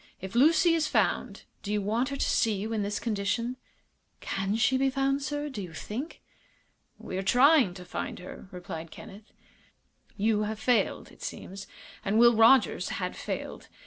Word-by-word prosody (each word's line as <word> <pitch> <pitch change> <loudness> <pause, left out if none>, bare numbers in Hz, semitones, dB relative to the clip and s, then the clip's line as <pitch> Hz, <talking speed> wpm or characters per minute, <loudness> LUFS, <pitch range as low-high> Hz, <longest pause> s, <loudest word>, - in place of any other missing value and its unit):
If 190 0 -7
Lucy 320 +7 +5
is 320 -2 +1
found - - 0 0.2
do 205 - -5
you 210 - +1
want 225 +6 0
her 280 - -4
to - - 0
see 220 -2 +2
you 215 +3 -4
in 215 - 0
this 205 +1 -2
condition?" 230 +3 -1 0.6
"Can 195 +2 -2
she 225 +3 +2
be 270 +1 +2
found, 275 +1 0
sir, 290 +1 -3
do 265 -8 -6
you 175 -3 -8
think?" 255 - -6 0.7
"We 185 - -5
are - - -1
trying 250 - +4
to 180 -1 -10
find - - -5
her," 180 +1 -10
replied 170 -2 -7
Kenneth. 205 +6 -12 0.9
"You 210 0 +2
have 215 0 -3
failed, 240 +2 0
it - - -19
seems, 195 +1 -7 0.4
and 205 +2 0
Will 235 0 +6
Rogers 230 +3 +4
had - - -3
failed. - - -6
220 Hz, 175 wpm, -28 LUFS, 200-265 Hz, 0.9 s, Will